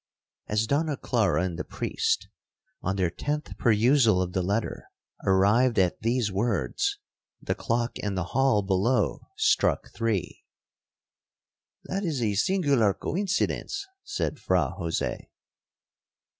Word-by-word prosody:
'As 105 +1 +1
Donna 145 +4 0
Clara 110 -7 +1
and 90 -2 -3
the - - -1
priest 450 0 -1 0.5
(on 95 - -1
their 90 -3 +1
tenth 150 - -3
perusal 115 -2 +4
of 90 -1 -2
the 95 - +1
letter) 100 +5 -2 0.4
arrived 105 +6 +4
at 90 -2 +2
these 115 -1 +1
words, 120 - 0 0.4
the - - -2
clock 120 0 -2
in 100 -2 -2
the 95 - -1
hall 135 -6 +3
below 100 +6 +1
struck 430 -1 +2
three. 115 -5 -2 1.4
'That 195 +2 -3
is 160 -7 -1
a 110 -3 +1
singular 135 - +2
coincidence,' 200 - -1 0.2
said 410 0 -3
Fra - - +1
Jose. - - -3
115 Hz, 120 wpm, -27 LUFS, 100-150 Hz, 1.4 s, perusal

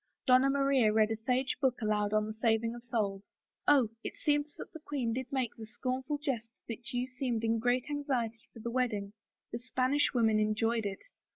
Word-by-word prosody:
Donna 255 +1 +6
Maria 275 -5 +3
read 215 0 +3
a - - +1
sage 250 +4 0
book 260 -3 +2
aloud 210 -2 +1
on 215 0 +2
the 215 - -5
saving 225 0 +1
of 240 0 -9
souls 210 -5 -2 0.2
— - - -44
Ob, 265 -7 +5
it - - -5
seems 295 0 +1
that - - -9
the 320 - -8
queen 275 -6 -2
did 255 +1 -4
make 260 -4 -1
the 225 - -8
scornful 260 +5 -2
jest 265 -6 -3 0.2
that 240 +3 -6
you 245 -1 0
seemed 255 -3 -2
in 225 0 +2
great 245 +2 +1
anxiety 255 -6 -2
for 225 - -12
the 235 - -3
wedding. 220 -5 -1 0.4
The 235 - -3
Spanish 255 +3 +1
women 225 -4 +3
enjoyed 220 +1 +1
it." 195 - -6
240 Hz, 200 wpm, -32 LUFS, 220-260 Hz, 0.4 s, Donna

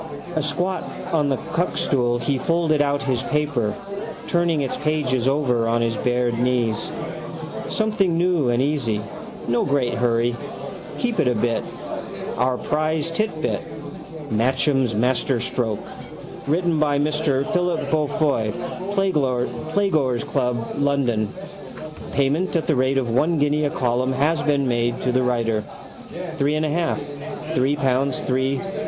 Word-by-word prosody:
Asquat 160 +6 -2
on 150 -3 +3
the 135 - +1 0.2
cuckstool 130 -7 +1
he 135 +1 0
folded 165 -1 +2
out 145 0 +1
his 130 -3 0
paper, 145 -8 0 0.5
turning 170 -3 +2
its 135 - -1
pages 135 -5 +1
over 130 -5 +2
on 115 +1 +2
his 115 -1 +1
bared 120 +1 +1
knees. 120 -3 +1 0.8
Something 210 -6 +1
new 170 -6 +2
and 120 +1 +2
easy. 135 -7 0 0.5
No 120 0 +2
great 140 -4 +1
hurry. 120 0 +2 0.6
Keep 240 -3 -1
it 140 - +3
a 125 - +3
bit. 115 +1 +1 0.7
Our 125 +1 +2
prize 155 +2 0
titbit: 165 -4 -1 0.7
Matcham's 130 +1 +2
Masterstroke. 120 -1 0 0.6
Written 165 +1 +2
by 145 -2 +3
Mr 145 -2 +1
Philip 180 -3 0
Beaufoy, 145 -7 +1 0.4
Playgoers' 155 - +1
Club, 125 -5 -1
London. 135 -7 +1 0.8
Payment 145 +7 +1
at 165 - +1
the 155 - +2
rate 130 +1 +2
of 125 -3 0
one 155 +8 +2
guinea 145 +1 +2
a - - +2
column 125 0 0
has 150 +5 +2
been 145 -2 +2
made 120 -1 +1
to 125 - +1
the 130 +1 +2
writer. 115 -3 +1 0.7
Three 145 +2 +2
and 155 0 +1
a 150 - 0
half. 165 -1 0 0.5
Three 140 -1 +2
pounds 135 -2 +1
three. 130 +1 0
140 Hz, 130 wpm, -23 LUFS, 125-155 Hz, 0.8 s, on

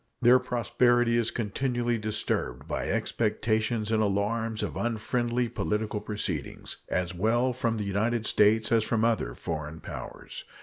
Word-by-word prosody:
Their 125 +1 +6
prosperity 120 -1 +2
is 115 -1 +2
continually 120 +1 -1
disturbed 105 - -2
by - - -2
expectations 110 0 0
and 110 -1 +3
alarms 110 +2 0
of - - -3
unfriendly 120 +1 0
political 105 -1 -2
proceedings, 100 -8 -4
as 90 0 -1
well 120 +7 +2
from 115 -2 -1
the 105 - -2
United 110 +3 0
States 110 +1 +4
as 115 -2 +4
from 110 0 +1
other 110 - 0
foreign 80 -1 -5
powers. 65 -8 -8
110 Hz, 135 wpm, -28 LUFS, 105-120 Hz, -, Their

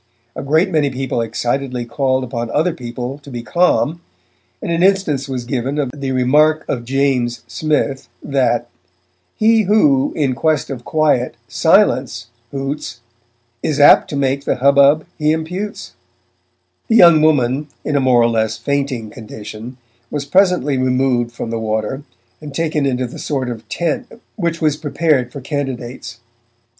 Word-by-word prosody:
A - - -4
great 160 +7 +2
many 150 -4 +2
people 130 -1 -2
excitedly 125 +2 -2
called 130 +2 0
upon 120 -1 -4
other 160 +7 +1
people 125 0 -6
to 145 - -14
be 120 -3 -6
calm, 170 +1 +1 0.6
and - - -4
an 165 0 0
instance 180 -8 +1
was 125 -2 -4
given 135 +2 -2
of 140 -4 -1
the 140 -2 -4
remark 150 +5 +3
of 120 -3 -3
James 130 -2 0
Smith 135 0 -2
that 120 -4 0 0.7
He 225 +1 +4
who, 150 -10 +3
in 140 -4 +1
quest 150 +1 0
of 125 -3 -6
quiet, 150 -6 +1
'Silence!' 140 - +2 0.2
hoots 135 -2 -5 0.6
Is 150 -2 -1
apt 145 - +7
to - - -4
make 140 0 0
the - - +1
hubbub 140 +3 +4
he 150 0 +2
imputes. 180 +7 -4 0.9
The 225 - +2
young 170 -7 +7
woman, 145 -2 +2 0.2
in 150 - -1
a - - +4
more 125 -3 +4
or - - +4
less 110 -2 0
fainting 130 -3 -2
condition, 110 +1 -9 0.3
was 145 -2 -4
presently 175 -5 +2
removed 125 -2 +1
from 115 -1 -6
the 115 - -2
water, 110 +4 -2 0.4
and 145 -2 -9
taken 155 -3 0
into 130 -1 -1
the 120 - -9
sort 130 -4 -2
of 110 -2 -9
tent 170 -3 -2 0.3
which 170 -5 -2
was 150 -2 +1
prepared 145 -4 0
for 140 - -8
candidates. 130 -4 -5
135 Hz, 150 wpm, -18 LUFS, 125-155 Hz, 0.9 s, apt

